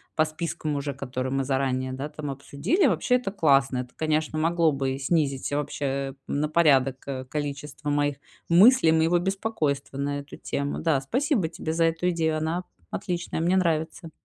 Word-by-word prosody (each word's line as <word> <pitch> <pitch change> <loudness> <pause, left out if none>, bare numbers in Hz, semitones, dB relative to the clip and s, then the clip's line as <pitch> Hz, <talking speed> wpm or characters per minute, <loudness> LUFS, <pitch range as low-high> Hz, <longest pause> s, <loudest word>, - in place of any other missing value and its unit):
по 155 - +4
спискам 155 -1 -3
уже, 140 0 -2
которые 130 0 -4
мы 135 0 +1
заранее, 130 -1 0
да, 135 +2 -4
там, 150 -1 -6
обсудили. 140 - 0
Вообще, 205 - +2
это 245 -6 -1
классно. 135 -8 +3
Это, 125 - -5
конечно, 155 0 0
могло 165 0 +3
бы 135 -1 -2
снизить, 140 -3 0
вообще, 140 -1 -2
на 150 +1 -1
порядок, 135 -5 +4
э, 130 -2 -4
количество 145 +1 -5
моих 145 -1 +1 0.3
мыслей, 185 0 +6
моего 160 +2 +3
беспокойства 175 -8 -2
на 145 +1 -1
эту 140 +1 -10
тему. 140 0 -3
Да, 155 -5 +1
спасибо 245 - 0
тебе 160 -1 -4
за 165 0 +3
эту 165 +2 +1
идею. 160 -2 0
Она 160 +3 -1 0.3
отличная, 175 - -3
мне 175 +3 +2
нравится. 165 -1 -1
150 Hz, 165 wpm, -26 LUFS, 140-170 Hz, 0.3 s, мыслей